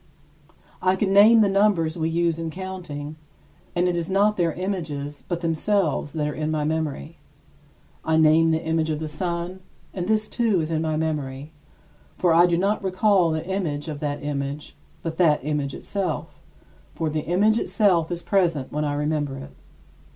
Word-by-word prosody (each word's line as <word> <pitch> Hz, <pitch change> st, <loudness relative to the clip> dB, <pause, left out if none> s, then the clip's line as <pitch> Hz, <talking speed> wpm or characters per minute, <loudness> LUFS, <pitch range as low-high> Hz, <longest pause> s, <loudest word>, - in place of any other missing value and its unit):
I 185 Hz, +1 st, +3 dB
can 195 Hz, 0 st, 0 dB
name 220 Hz, +3 st, +7 dB
the 210 Hz, -, +4 dB
numbers 195 Hz, -5 st, +2 dB
we 160 Hz, -1 st, -1 dB
use 165 Hz, 0 st, 0 dB
in 165 Hz, -1 st, -3 dB
counting, 160 Hz, -5 st, -7 dB, 0.6 s
and 175 Hz, +1 st, +2 dB
it 180 Hz, -, 0 dB
is 170 Hz, 0 st, -2 dB
not 205 Hz, +2 st, +3 dB
their 170 Hz, -3 st, +1 dB
images 155 Hz, -6 st, -4 dB
but 175 Hz, -1 st, -3 dB
themselves 165 Hz, -2 st, 0 dB
that 150 Hz, -2 st, -1 dB
are 150 Hz, -, -3 dB
in 155 Hz, +1 st, -3 dB
my 155 Hz, -1 st, 0 dB
memory. 155 Hz, -, -3 dB, 0.8 s
I 160 Hz, 0 st, +1 dB
name 160 Hz, +1 st, +5 dB
the 160 Hz, +1 st, 0 dB
image 160 Hz, 0 st, 0 dB
of 155 Hz, -, -1 dB
the 155 Hz, +1 st, -4 dB
sun, 175 Hz, +3 st, -4 dB, 0.3 s
and 180 Hz, -2 st, -3 dB
this 215 Hz, 0 st, +1 dB
too 225 Hz, -6 st, +1 dB
is 160 Hz, 0 st, -2 dB
in 160 Hz, -1 st, 0 dB
my 155 Hz, -1 st, -1 dB
memory. 150 Hz, -2 st, -3 dB, 0.7 s
For 175 Hz, -2 st, +3 dB
I 170 Hz, +2 st, +6 dB
do 170 Hz, -1 st, +1 dB
not 200 Hz, +4 st, 0 dB
recall 190 Hz, -1 st, +3 dB
the 160 Hz, 0 st, -2 dB
image 170 Hz, -6 st, -2 dB
of 150 Hz, -2 st, -5 dB
that 145 Hz, -1 st, -3 dB
image, 145 Hz, 0 st, -4 dB, 0.3 s
but 160 Hz, -1 st, -4 dB
that 150 Hz, -6 st, +3 dB
image 150 Hz, -2 st, -2 dB
itself, 190 Hz, -5 st, -3 dB, 0.6 s
for 160 Hz, -, -2 dB
the 155 Hz, 0 st, -1 dB
image 210 Hz, +6 st, +3 dB
itself 180 Hz, -7 st, +2 dB
is 175 Hz, 0 st, -4 dB
present 170 Hz, -9 st, +1 dB
when 150 Hz, +1 st, -1 dB
I 145 Hz, -1 st, -1 dB
remember 145 Hz, -2 st, -1 dB
it. 135 Hz, -, -9 dB
165 Hz, 180 wpm, -24 LUFS, 150-185 Hz, 0.8 s, name